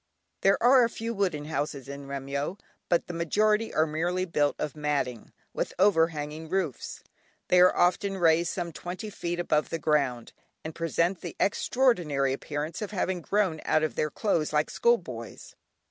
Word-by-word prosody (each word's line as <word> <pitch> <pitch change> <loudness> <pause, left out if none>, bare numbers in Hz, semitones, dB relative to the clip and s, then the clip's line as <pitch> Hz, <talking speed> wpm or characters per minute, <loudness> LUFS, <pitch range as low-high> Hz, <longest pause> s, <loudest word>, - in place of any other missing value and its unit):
There 195 +1 +4
are 250 +1 +7
a 230 - +2
few 230 0 -4
wooden 180 -8 -1
houses 145 -3 -3
in 140 0 -8
Remyo, 140 +5 -3 0.3
but 170 - +2
the 175 - -7
majority 210 +6 +1
are 155 - +2
merely 175 +4 -1
built 150 -4 +1
of 150 -1 -4
matting, 145 -6 -2 0.2
with - - -3
over 185 -4 +5
hanging 155 0 -6
roofs. 180 -7 -3 0.5
They 180 - +5
are 180 - +5
often 190 +2 +2
raised 170 -1 +3
some 175 -2 -4
twenty 180 +6 -6
feet 175 -2 -4
above 155 -3 +1
the 165 - -2
ground, 140 -6 0 0.3
and 160 - -5
present 170 +2 0
the - - -7
extraordinary 175 - +2
appearance 150 +5 -4
of 210 - -3
having 185 -3 -2
grown 190 -4 0
out 155 - +2
of 155 - 0
their 150 - -1
clothes 165 -2 0
like 150 0 +1
school 235 0 +3
boys. 120 - -9
165 Hz, 170 wpm, -28 LUFS, 150-190 Hz, 0.5 s, are